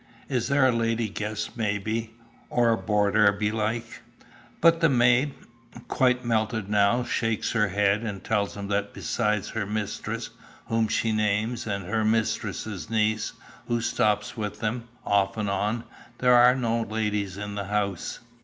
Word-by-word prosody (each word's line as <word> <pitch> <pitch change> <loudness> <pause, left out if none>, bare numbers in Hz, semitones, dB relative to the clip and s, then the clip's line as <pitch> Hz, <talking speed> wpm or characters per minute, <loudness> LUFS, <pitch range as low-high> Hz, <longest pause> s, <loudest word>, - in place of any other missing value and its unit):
Is 125 -4 0
there 140 -1 +3
a - - +4
lady 115 -1 0
guest 105 +1 -4
maybe, 110 +1 -2 0.3
or 120 -1 +3
a - - +4
boarder 105 -1 +3
belike?" 110 +3 -2 0.6
But 165 0 +5
the 165 - +5
maid, 125 +2 +3 0.5
quite 125 -1 +2
melted 110 -2 0
now, 105 +4 +3
shakes 115 -2 -1
her 105 -3 +2
head, 100 +2 +2
and 100 -5 -5
tells 105 -2 -1
him 100 0 -5
that 100 0 -1
beside 105 -4 0
her 110 -3 -3
mistress, 105 -1 -4 0.3
whom 115 -1 +1
she 110 +1 0
names, 110 +2 0
and 100 -3 -3
her 110 +4 0
mistress' 110 -2 -1
niece, 110 -1 0 0.3
who 120 0 +1
stops 105 -2 0
with 105 -2 -4
them, 115 +2 -2 0.2
"off 100 0 +2
and 105 -2 -1
on," 105 +4 -1 0.3
there 125 -1 +4
are 125 +1 +7
no 115 -2 0
ladies 105 -3 -2
in 105 0 -5
the 100 -1 -4
house. 100 -3 -2
110 Hz, 155 wpm, -26 LUFS, 105-115 Hz, 0.6 s, are